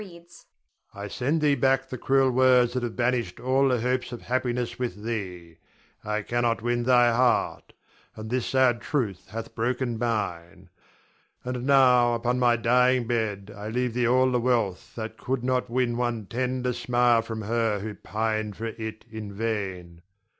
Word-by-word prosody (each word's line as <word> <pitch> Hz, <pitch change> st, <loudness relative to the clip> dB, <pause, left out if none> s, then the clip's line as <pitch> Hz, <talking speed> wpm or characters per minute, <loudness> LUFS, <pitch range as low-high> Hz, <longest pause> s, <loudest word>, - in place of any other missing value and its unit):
_] 170 Hz, -3 st, -14 dB, 0.5 s
I 100 Hz, +1 st, -6 dB
send 140 Hz, +9 st, -1 dB
thee 150 Hz, -1 st, +4 dB
back 135 Hz, -1 st, +2 dB
the 130 Hz, -, -5 dB
cruel 135 Hz, +1 st, +3 dB
words 125 Hz, -1 st, +4 dB
that 125 Hz, -, -1 dB
have 120 Hz, -2 st, -4 dB
banished 120 Hz, -6 st, -1 dB
all 135 Hz, +2 st, +2 dB
the 125 Hz, -2 st, +1 dB
hopes 125 Hz, +1 st, -1 dB
of 120 Hz, -, -8 dB
happiness 120 Hz, -1 st, -2 dB
with 105 Hz, -5 st, -4 dB
thee. 90 Hz, -7 st, -5 dB, 0.5 s
I 105 Hz, 0 st, -2 dB
cannot 120 Hz, 0 st, 0 dB
win 120 Hz, 0 st, 0 dB
thy 120 Hz, -1 st, +5 dB
heart; 125 Hz, 0 st, +1 dB, 0.4 s
and 110 Hz, +1 st, -8 dB
this 125 Hz, -1 st, -1 dB
sad 130 Hz, -3 st, +2 dB
truth 110 Hz, -, -2 dB
hath 115 Hz, +2 st, -7 dB
broken 120 Hz, 0 st, -2 dB
mine. 95 Hz, -6 st, -3 dB, 0.7 s
And 125 Hz, +1 st, -4 dB
now, 125 Hz, -3 st, +5 dB
upon 120 Hz, +2 st, -1 dB
my 120 Hz, -1 st, +4 dB
dying 125 Hz, +2 st, +3 dB
bed, 105 Hz, -4 st, -2 dB
I 105 Hz, +1 st, -6 dB
leave 125 Hz, +1 st, -1 dB
thee 120 Hz, 0 st, +1 dB
all 130 Hz, +1 st, +3 dB
the 125 Hz, -, +2 dB
wealth 115 Hz, -7 st, -1 dB
that 110 Hz, -1 st, -6 dB
could 130 Hz, -1 st, -2 dB
not 125 Hz, -1 st, 0 dB
win 120 Hz, -1 st, 0 dB
one 120 Hz, -3 st, -2 dB
tender 125 Hz, +3 st, -2 dB
smile 120 Hz, -1 st, +2 dB
for 115 Hz, 0 st, -6 dB
her 110 Hz, 0 st, 0 dB
who 105 Hz, +1 st, -5 dB
pined 110 Hz, +1 st, -3 dB
for 115 Hz, -, -5 dB
it 110 Hz, -1 st, -6 dB
in 110 Hz, -2 st, -7 dB
vain. 95 Hz, -6 st, -4 dB
120 Hz, 170 wpm, -26 LUFS, 110-125 Hz, 0.7 s, thy